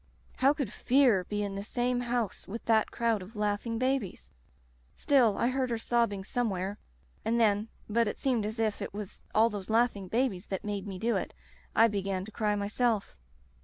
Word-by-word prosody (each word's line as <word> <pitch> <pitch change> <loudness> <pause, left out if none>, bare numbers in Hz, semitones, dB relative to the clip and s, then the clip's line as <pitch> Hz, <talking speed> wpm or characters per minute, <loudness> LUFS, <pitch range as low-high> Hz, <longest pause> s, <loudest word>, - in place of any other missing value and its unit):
How 270 +2 +5
could 280 -8 -3
Fear 245 -8 +3
be 210 +2 -2
in 200 -1 -3
the 200 0 -4
same 245 +2 0
house 240 -4 -2
with 225 +4 -6
that 220 -1 +3
crowd 230 -3 0
of 195 +5 -11
laughing 210 +2 -1
babies? 255 - -1 0.6
Still 250 -7 +3
I 235 - +2
heard 260 -1 0
her 230 - 0
sobbing 230 -4 0
somewhere, 200 -3 -2 0.4
and 230 +1 +1
then 210 -1 +3
— - - -31
^but 230 +1 +2
it - - -3
seemed 250 -5 +1
as 215 +2 -4
if 220 -2 0
it - - -5
was 205 -2 -7
all 225 +2 +5
those 205 -1 -6
laughing 220 -4 +2
babies 220 -3 0
that 190 0 -4
made 205 -1 -3
me 195 -2 -5
do 230 +5 +1
it - - -4 0.2
— - - -30
I 225 - +7
began 195 -3 -2
to 220 - -11
cry 210 -1 0
myself. 210 +1 0
220 Hz, 200 wpm, -30 LUFS, 200-240 Hz, 0.6 s, I